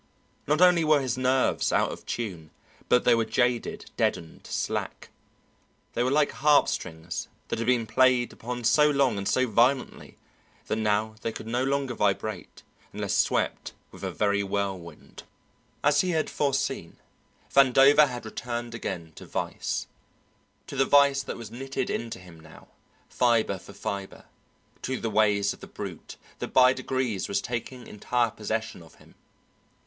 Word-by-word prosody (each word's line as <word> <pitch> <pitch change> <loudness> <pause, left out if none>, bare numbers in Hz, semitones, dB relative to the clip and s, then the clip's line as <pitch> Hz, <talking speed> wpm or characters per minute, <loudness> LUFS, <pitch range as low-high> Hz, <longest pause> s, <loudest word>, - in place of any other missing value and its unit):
Not 150 +4 +2
only 180 -2 +6
were 155 -1 +4
his 130 -3 -2
nerves 130 0 +1
out - - +2
of - - -10
tune, 90 -10 -4 0.4
but 125 - +4
they 120 - +5
were 115 -1 +2
jaded, 120 +2 -1
deadened, 80 - -2
slack; - - -3 0.8
they 120 - -1
were 125 - +2
like 145 +1 +2
harpstrings 90 - +1 0.2
that - - -2
had 115 - -2
been 125 -2 +2
played 130 0 +3
upon 120 +1 -6
so 150 +6 +5
long 135 -7 +2
and 100 - -4
so 130 - +2
violently 125 +4 +1 0.5
that 110 - -2
now 110 0 0
they 115 - -2
could 110 - -8
no 120 +3 -1
longer 135 -1 -1
vibrate 105 -2 -2 0.3
unless - - -3
swept - - 0 0.2
with - - -13
a - - -1
very 100 -1 +1
whirlwind. 95 -5 -5 0.6
As 145 0 +4
he 185 - -1
had 160 -3 0
foreseen, 135 - -1 0.6
Vandover 140 +2 +6
had 120 -3 -7
returned 120 +1 -5
again 85 -8 -5
to - - -10
vice, - - -3 0.8
to - - -8
the 135 - +3
vice 140 0 +5
that - - -6
was 115 -3 -9
knitted 135 +3 -4
into 115 -1 -4
him 90 -3 -14
now, 80 -1 -16 0.4
fibre 115 -5 +1
for - - -13
fibre, 100 -1 -6 0.6
to 130 -1 -3
the 115 - -3
ways 105 -1 +2
of - - -15
the - - -10
brute - - -8 0.2
that - - -3
by 130 0 +6
degrees 130 -6 -2
was 100 - 0
taking 120 +1 -5
entire 120 +2 -1
possession 110 -1 -4
of 80 - -16
him. - - -20
120 Hz, 155 wpm, -27 LUFS, 105-135 Hz, 0.8 s, only